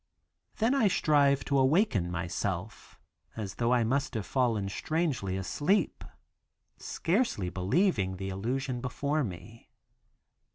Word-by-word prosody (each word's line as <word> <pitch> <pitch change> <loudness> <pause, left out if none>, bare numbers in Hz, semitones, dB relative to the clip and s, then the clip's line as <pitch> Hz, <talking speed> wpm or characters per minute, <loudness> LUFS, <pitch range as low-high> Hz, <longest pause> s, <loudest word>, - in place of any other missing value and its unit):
Then 230 +4 +2
I 270 -6 +4
strive 145 -6 +3
to 140 -1 +2
awaken 130 - +2
myself, 90 +3 -4 0.4
as 105 -4 -5
though 120 +1 +2
I 125 -2 +4
must 135 +3 0
have 110 -4 -2
fallen 115 -4 0
strangely 120 - -1
asleep, 150 - 0 0.8
scarcely 170 - 0
believing 95 - +1
the 95 +1 -4
illusion 120 +6 -2
before 140 +4 -1
me. 110 +3 -8
125 Hz, 115 wpm, -29 LUFS, 95-150 Hz, 0.8 s, I